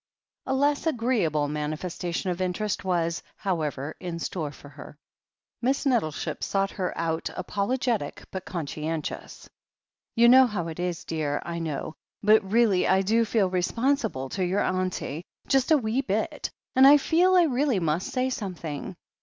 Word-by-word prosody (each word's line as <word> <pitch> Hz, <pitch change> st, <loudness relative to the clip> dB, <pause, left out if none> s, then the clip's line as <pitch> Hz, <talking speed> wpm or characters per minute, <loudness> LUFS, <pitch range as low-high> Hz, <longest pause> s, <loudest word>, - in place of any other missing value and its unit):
A 265 Hz, -, +1 dB
less 285 Hz, +3 st, +1 dB
agreeable 225 Hz, -, +1 dB
manifestation 165 Hz, +5 st, -3 dB
of 175 Hz, +1 st, -4 dB
interest 185 Hz, +3 st, -1 dB
was, 170 Hz, -3 st, 0 dB
how 185 Hz, -5 st, -1 dB
ever, 145 Hz, 0 st, -4 dB
in 175 Hz, -2 st, -5 dB
store 160 Hz, -3 st, -3 dB
for 145 Hz, -, -14 dB
her. 145 Hz, -, -12 dB, 0.6 s
Miss 265 Hz, +4 st, 0 dB
Nettleship 225 Hz, -, 0 dB
sought 195 Hz, 0 st, 0 dB
her 185 Hz, -2 st, -2 dB
out 165 Hz, 0 st, -1 dB
apologetic 220 Hz, -, -1 dB
but 190 Hz, -1 st, -5 dB
con 170 Hz, -6 st, -4 dB
scientious. 155 Hz, +2 st, -5 dB, 0.7 s
"You 235 Hz, 0 st, +6 dB
know 260 Hz, +1 st, +8 dB
how 180 Hz, -7 st, -3 dB
it 160 Hz, -, -8 dB
is, 175 Hz, -1 st, -2 dB
dear, 150 Hz, -3 st, -1 dB
I 170 Hz, 0 st, -4 dB
know 155 Hz, -1 st, -4 dB, 0.2 s
— -, -, -16 dB
^but 215 Hz, +1 st, +7 dB
really 205 Hz, -1 st, +2 dB
I 190 Hz, +1 st, +3 dB
do 225 Hz, +4 st, +3 dB
feel 215 Hz, -3 st, +2 dB
responsible 220 Hz, -, 0 dB
to 190 Hz, -, -2 dB
your 185 Hz, +3 st, +1 dB
auntie, 185 Hz, -4 st, -2 dB, 0.2 s
just 270 Hz, 0 st, +2 dB
a 315 Hz, -, +6 dB
wee 235 Hz, 0 st, 0 dB
bit 215 Hz, -4 st, -2 dB
— -, -, -50 dB
^and 260 Hz, +1 st, +8 dB
I 290 Hz, +1 st, +9 dB
feel 355 Hz, +6 st, +3 dB
I 360 Hz, -, +7 dB
really 270 Hz, -, +1 dB
must 165 Hz, +1 st, 0 dB
say 260 Hz, 0 st, 0 dB
something. 180 Hz, -, -5 dB
190 Hz, 165 wpm, -26 LUFS, 165-240 Hz, 0.7 s, I